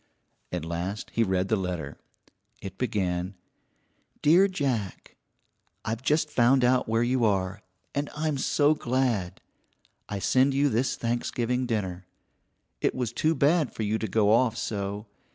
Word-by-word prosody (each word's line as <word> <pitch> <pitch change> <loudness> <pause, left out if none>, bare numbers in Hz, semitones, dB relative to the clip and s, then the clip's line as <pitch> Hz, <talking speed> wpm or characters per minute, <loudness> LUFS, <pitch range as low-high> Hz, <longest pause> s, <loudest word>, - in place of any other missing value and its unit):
At 90 -3 -3
last 85 +5 -4
he 115 - +1
read 95 -3 +1
the 110 - +2
letter. 90 -4 -4 0.6
It 100 -2 -9
began: 95 -5 -1 0.9
DEAR 175 +6 +6
JACK: 130 - -3 0.7
I've 115 +2 -2
just 150 +3 +1
found 125 +2 +4
out 125 -1 +2
where 115 +1 +2
you 125 0 +1
are, 95 -2 0 0.3
and 145 0 -2
I'm 150 -2 -1
so 145 +2 +3
glad. 125 - -1 0.7
I 100 - -3
send 130 +7 +2
you 140 +1 +3
this 120 +3 0
Thanksgiving 120 +1 -1
dinner. 95 -5 -3 0.7
It - - +1
was 120 -3 -2
too 155 +6 +1
bad 150 +1 +2
for 110 - -3
you 110 +1 0
to 110 - -2
go 105 +1 +2
off 115 0 +3
so. 100 0 -3
115 Hz, 145 wpm, -27 LUFS, 100-130 Hz, 0.9 s, DEAR